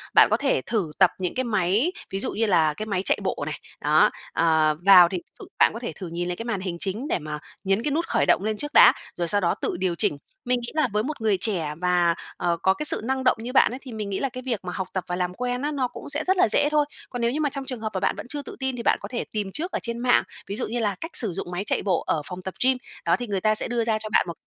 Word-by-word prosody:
bạn - - +8
có - - +4
thể - - +1
thử 200 -9 -2
tập 185 - +6
những 180 -2 -2
cái 255 - 0
máy, 215 - +1 0.2
ví 195 - -3
dụ - - -2
như 225 - +1
là 165 -7 +3
cái 215 - -5
máy 200 -4 -1
chạy - - +4
bộ - - -2
này. - - -5 0.2
Đó, - - +4 0.2
ờ, 160 -2 +3
vào 180 -3 +9
thì 185 - -2
ví 170 - -8 0.2
dụ - - -9
bạn - - +5
có 230 - -6
thể 240 - -5
thử 185 - -8
nhìn 170 +1 -3
lại 180 - -2
cái 230 - -7
màn 235 -5 -2
hình 180 -3 -4
chính 210 +10 -2
để - - 0
mà 150 -1 -6 0.2
nhấn 195 +3 +1
cái 295 - -1
nút 330 +4 0
khởi - - +1
động - - +4
lên 215 0 -1
trước 295 +6 -5
đã, - - +8 0.2
rồi 175 - -1
sau 205 +4 +3
đó 170 - +2
tự - - -2
điều 185 -2 0
chỉnh. 145 - +1 0.3
Mình 250 0 +1
nghĩ 235 - -6
là 310 -4 +3
với 210 - +1
một 290 -1 -5
người 215 -3 +2
trẻ 175 -9 0
và, 175 -2 +2 0.2
ờ, 175 -1 0
có 190 - +5
cái 300 - -5
sự - - +2
năng 265 +2 -1
động 255 - +3
như 245 +2 -6
bạn 270 - +5
ấy, 255 - -6
thì 260 - -10
mình 210 -2 -4
nghĩ 195 - -2
là 275 - -1
cái 255 0 -8
việc 235 -5 -1
mà 180 - -4
học 190 -2 -3
tập 185 - -2
và 180 - -2
làm 180 0 -2
quen 250 +4 -3
á, 295 +1 -1
nó 265 -4 0
cũng 245 - -10
sẽ 295 +2 0
rất 375 +3 +1
là - - +5
dễ 290 - +3
thôi. 300 -1 +3 0.2
Còn 245 - -5
nếu 235 0 +2
như 295 - -2
mà 295 - +1
trong 275 0 -5
trường 255 -4 -5
hợp 220 - -2
và 190 - -1
bạn - - 0
vẫn 205 +4 -8
chưa 290 +3 -4
tự - - -10
tin 265 -1 -2
thì 235 - -5
bạn - - +3
có 200 - -6
thể 245 - -2
tìm 205 -3 -3
trước 340 - -2
ở - - -1
trên 235 0 -3
mạng, 245 0 +3 0.2
ví 200 - -4
dụ - - -2
như 240 +2 -3
là 205 -4 0
cách 330 - -5
sử 215 -7 +5
dụng 175 0 -5
máy 180 +2 -2
chạy - - 0
bộ 185 -4 0
ở 155 - +1
phòng 180 0 -7
tập 190 0 -6
gym, 260 0 +3 0.3
đó - - +4
thì 245 - -5
người 195 -3 -2
ta 215 +2 +3
sẽ - - +1
đưa 240 -1 0
ra 225 -1 +1
cho 215 - -6
bạn - - +3
một 170 - -4
215 Hz, 325 wpm, -24 LUFS, 180-250 Hz, 0.3 s, vào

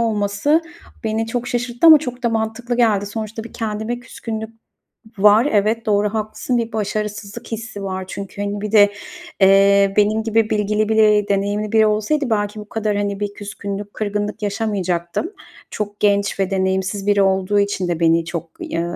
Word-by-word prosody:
olması 220 +8 +1 0.4
beni 220 +1 -1
çok 240 +1 -3
şaşırttı 245 +4 0
ama 315 -2 +10
çok 250 -3 -6
da 235 - +2
mantıklı 225 +2 -2
geldi. 215 -4 +2
Sonuçta 220 +1 -5
bir 230 - -11
kendime 220 +2 -3
küskünlük 220 -2 -6 0.7
var. 210 +6 +5
Evet, 220 +2 +1
doğru, 210 0 +1
haklısın. 220 +3 -2
Bir 230 -1 -2
başarısızlık 210 -1 -4
hissi 220 -2 -6
var 190 -1 -3
çünkü, 200 +1 -7
hani, 205 0 -3
bir 210 - -4
de, 205 -2 +6 0.5
eee, 195 0 +5
benim 215 +1 +3
gibi 225 0 +1
bilgili 210 0 0
biri, 215 -2 +4
deneyimli 205 +1 0
biri 220 -1 +5
olsaydı 245 +6 0
belki 205 -1 -1
bu 210 0 -10
kadar, 215 -2 -1
hani, 200 -1 -2
bir 205 -1 -3
küskünlük, 205 0 -6
kırgınlık 210 0 -3
yaşamayacaktım. 200 - -2 0.4
Çok 205 -1 -5
genç 200 -1 +1
ve 195 0 +1
deneyimsiz 190 +1 -1
biri 205 -1 +4
olduğu 195 +1 +2
için 200 -2 0
de 170 -1 -2
beni 165 0 +3
çok 170 -1 -5
ya 170 +1 -3
210 Hz, 165 wpm, -20 LUFS, 200-220 Hz, 0.7 s, ama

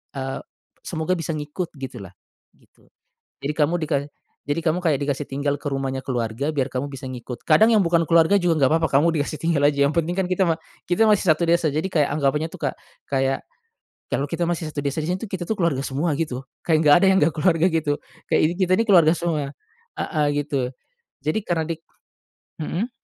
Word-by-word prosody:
eee, 135 0 -3 0.5
semoga 160 +3 -1
bisa 160 -1 -3
ngikut, 150 +4 -4
gitulah, 120 -8 -8 0.4
gitu. - - -28 0.5
Jadi 145 +2 -2
kamu 160 +3 +2
dika 155 -2 0 0.5
jadi 160 +3 -1
kamu 170 +3 +1
kayak 160 -5 +2
dikasih 140 0 -2
tinggal 140 +1 -1
ke 145 - -2
rumahnya 135 -1 -2
keluarga 125 +2 -2
biar 140 -3 0
kamu 130 +3 -2
bisa 135 -1 -8
ngikut, 125 -1 -7
kadang 215 +9 +6
yang 210 -3 +5
bukan 170 0 +3
keluarga 165 +3 +5
juga 170 -2 +2
nggak 130 - +2
papa, 160 - +2
kamu 165 +3 +3
dikasih 150 +2 -4
tinggal 165 -3 +1
aja, 140 -1 +3
yang 140 - 0
penting 170 +1 0
kan 190 - +1
kita 185 +1 0
ma 165 -1 +2 0.3
kita 180 +5 +4
masih 205 -3 +3
satu 160 +2 +3
desa, 165 -2 +3
jadi 155 +5 -1
kayak 150 -5 +2
anggapannya 150 +2 +1
tuh - - -10
Kak - - -6 0.4
kayak, 135 -1 0 0.7
kalau 140 - 0
kita 175 - -1
masih 170 -2 -2
satu 145 - -3
desa 140 +2 -2
di - - -3
sini 180 - 0
tuh, 220 - -6
kita 185 -2 -3
tuh 220 - 0
keluarga 170 -7 +1
semua 145 +5 -1
gitu, 135 -6 -2 0.2
kayak 160 -2 +4
nggak 145 -2 +7
ada - - +6
yang 190 - +4
nggak 155 0 +3
keluarga 165 +1 +3
gitu, 155 -3 0 0.3
kayak - - +4
ini - - -3
kita 185 -1 +2
nih 230 - +1
keluarga 170 -5 +6
semua, 150 -5 -2 0.5
heeh, 150 -3 0 0.2
gitu. 135 -4 -1 0.5
Jadi 155 +8 +1
karena 165 -2 0
dik 165 -1 -4 0.8
mhm? 205 +11 -2
155 Hz, 205 wpm, -23 LUFS, 140-170 Hz, 0.8 s, nggak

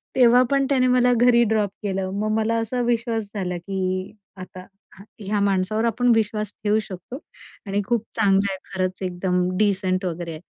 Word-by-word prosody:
तेव्हा 250 -1 +6
पण 275 -1 +3
त्याने 260 -2 +3
मला 250 0 +4
घरी 240 0 +4
ड्रॉप 215 -2 +1
केलं. 190 -2 -2
मग 215 +1 -1
मला 220 +1 0
असा 245 +3 -2
विश्वास 230 -1 -1
झाला, 180 -3 -2
की 195 +3 -6 0.6
आता, 185 0 -10 0.3
ह - - -11 0.2
ह्या 205 0 -2
माणसावर 200 +2 +1
आपण 240 +2 +2
विश्वास 210 -1 -1
ठेऊ 210 +1 +2
शकतो 190 +8 -8 0.5
आणि 200 0 -1
खूप 235 -3 0
चांगला 200 -2 +2
आहे, - - -6 0.2
खरंच 185 0 -2
एकदम 180 0 -1
डिसेंट 190 -2 +1
वगैरे 170 -1 -4
आहे. 155 0 -8
205 Hz, 170 wpm, -23 LUFS, 185-230 Hz, 0.6 s, तेव्हा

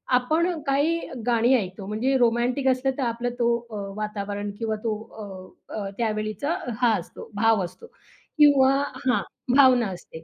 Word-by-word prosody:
आपण 310 +8 +2 0.2
काही 295 +5 +2 0.3
गाणी 240 +1 +3
ऐकतो, 195 -3 -3
म्हणजे 230 +6 0
रोमॅन्टिक 245 +3 +1
असलं, 260 +1 +2
तर 275 - -1
आपलं 235 +1 -1
तो 235 0 +3 0.2
अ, - - -6 0.2
वातावरण 205 -1 -4
किंवा 225 -2 -1
तो 225 -2 0 0.8
अ, - - -7
अ, 200 -2 -3
त्यावेळीचा 215 - -1 0.3
हा 240 -2 +4
असतो, 170 - -11
भाव 225 -1 +3
असतो 180 - -9 0.5
किंवा 285 -3 +6 0.4
हां. 250 - +3 0.3
भावना 255 -4 +6
असते 160 -3 -10
235 Hz, 145 wpm, -25 LUFS, 215-265 Hz, 0.8 s, किंवा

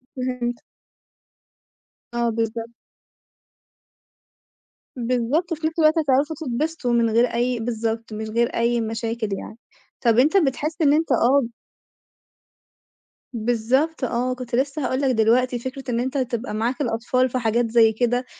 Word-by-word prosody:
فهمتك. 250 -2 -3 1.5
آه، 235 0 +1
بالضبط. 225 +1 -2 2.3
بالضبط، 250 +8 0
وفي 315 -1 -1
نفس 320 +1 -5
الوقت 315 +1 +4
هتعرفوا 290 +1 +1
تتبسطوا 290 -1 -2
من 230 -1 +3
غير 230 +2 +4
أي 245 0 -1
بالضبط، 225 -1 -3
من 220 +1 -4
غير 235 +1 +2
أي 235 0 +1
مشاكل 225 0 -3
يعني، 220 - -9 0.4
طَب 235 -1 +3
أنت 310 +9 +4
بتحس 305 +1 0
إن 290 -1 +5
أنت 320 +2 +1
أب 260 +1 +3 1.9
بالضبط 245 +7 0
آه، 250 +1 0
كنت 250 -2 -5
لسه 275 +1 -1
هاقول 260 +2 -1
لك 270 - +2
دلوقتي، 240 +3 +2
فكرة 260 +2 -6
إن 235 - 0
أنت 260 +3 -2
تبقى 250 -3 -2
معاك 235 +6 -1
الأطفال 250 +1 0
في 255 - -1
حاجات 230 0 0
زي 225 -2 +5
كده، 245 +2 0
245 Hz, 135 wpm, -23 LUFS, 230-270 Hz, 2.3 s, إن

